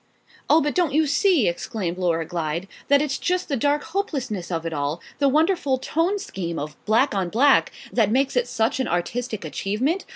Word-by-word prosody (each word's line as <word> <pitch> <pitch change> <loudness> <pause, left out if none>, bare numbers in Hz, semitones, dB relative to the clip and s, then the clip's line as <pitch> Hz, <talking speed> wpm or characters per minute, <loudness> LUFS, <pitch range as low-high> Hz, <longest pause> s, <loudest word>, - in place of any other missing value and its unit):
'" - - -27
"Oh, 320 - +6
but 295 +1 0
don't 345 -6 +1
you 315 0 +4
see," 300 - +3
exclaimed 180 0 -3
Laura 165 -3 0
Glyde, 170 +1 -3 0.2
"that 285 +1 +4
it's 275 -2 -2
just 360 0 -1
the 280 - +1
dark 290 +4 +1
hopelessness 265 - -3
of 165 -1 -2
it 165 - -3
all 145 +2 -2 0.2
the 280 -1 +4
wonderful 305 -2 +2
tone 330 +9 0
scheme 175 - -5
of 150 +1 -5
black 230 +6 +3
on 190 -3 -1
black 270 +9 +4 0.2
that 220 -4 +3
makes 265 +4 +1
it 245 -1 +2
such 235 +2 0
an 260 - 0
artistic 215 +5 -2
achievement? 255 - -1
245 Hz, 195 wpm, -23 LUFS, 175-290 Hz, 0.2 s, Oh